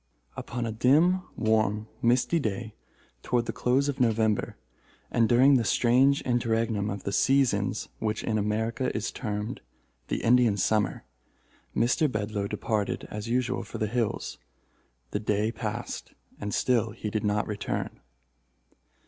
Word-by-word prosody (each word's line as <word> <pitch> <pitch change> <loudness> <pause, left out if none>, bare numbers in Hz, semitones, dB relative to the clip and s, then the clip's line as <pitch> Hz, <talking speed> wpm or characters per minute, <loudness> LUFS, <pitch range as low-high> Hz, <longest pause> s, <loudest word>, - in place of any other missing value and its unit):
Upon 120 0 -4
a 115 - -2
dim, 150 +11 +4
warm, 110 -1 +1
misty 125 +8 +3
day, 110 -3 -3 0.5
toward 120 -1 0
the - - -3
close 130 +3 +1
of 140 -2 -2
November, 110 -3 +1 0.5
and 115 -1 +3
during 130 +3 +6
the 120 - +1
strange 130 +5 +3
interregnum 115 -3 0
of 100 -2 -5
the 100 - -2
seasons 135 +5 +2
which 110 0 -2
in 110 -1 0
America 110 +5 -1
is 110 - -2
termed 105 0 -4 0.5
the - - -2
Indian 120 -3 +4
Summer, 105 +2 +1 0.7
Mr. 130 +5 +2
Bedloe 105 -2 -2
departed 105 -1 -2
as 105 +2 -5
usual 125 +1 0
for - - -8
the 110 - 0
hills. 115 0 -2 0.7
The 105 - -1
day 105 +1 0
passed, 115 +1 -5 0.3
and 105 0 -4
still 115 -1 +2
he 110 -2 -5
did 110 -1 -1
not 105 0 +1
return. 105 -1 -4
115 Hz, 140 wpm, -27 LUFS, 105-125 Hz, 0.7 s, during